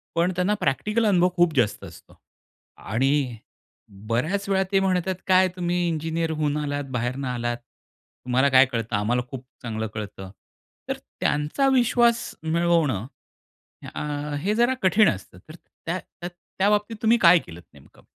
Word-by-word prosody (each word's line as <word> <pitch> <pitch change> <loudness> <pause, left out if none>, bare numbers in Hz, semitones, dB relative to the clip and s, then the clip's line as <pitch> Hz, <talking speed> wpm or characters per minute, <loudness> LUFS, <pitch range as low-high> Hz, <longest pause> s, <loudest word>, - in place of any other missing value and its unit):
पण 170 +2 +2
त्यांना 180 +3 +1
प्रॅक्टिकल 215 +11 0
अनुभव 180 -3 +4
खूप 175 -2 +3
जास्त 115 -5 +1
असतो - - -15 0.6
आणि 130 +1 0 0.7
बऱ्याच 155 - -1
वेळा 190 0 +2
ते 195 - +4
म्हणतात 185 -1 0
काय 185 0 +5
तुम्ही 175 0 -1
इंजिनिअर 165 0 -2
होऊन 150 -1 -1
आलात 145 -1 -2
बाहेरनं 125 +2 -2
आलात, 120 -1 -2
तुम्हाला 125 +2 -3
काय 130 0 +7
कळतं 115 -4 -3
आम्हाला 110 +5 +1
खूप 130 -1 -8 0.2
चांगलं 110 -2 -3
कळतं 100 -3 -7 0.6
तर - - -1 0.2
त्यांचा 150 - +1
विश्वास 240 -1 +2
मिळवणं, 160 - +1 0.9
अ, 150 0 -4
हे 205 +5 0
जरा 240 +3 +3
कठीण 195 +3 +4
असतं 95 -3 -6
तर 155 - -10
त्या 175 +1 -7 0.6
त्या 195 +2 +4
बाबतीत 210 +2 0
तुम्ही 230 +1 +4
काय 170 0 +7
केलंत 85 - -12
नेमकं? - - -19
160 Hz, 140 wpm, -24 LUFS, 125-185 Hz, 0.9 s, काय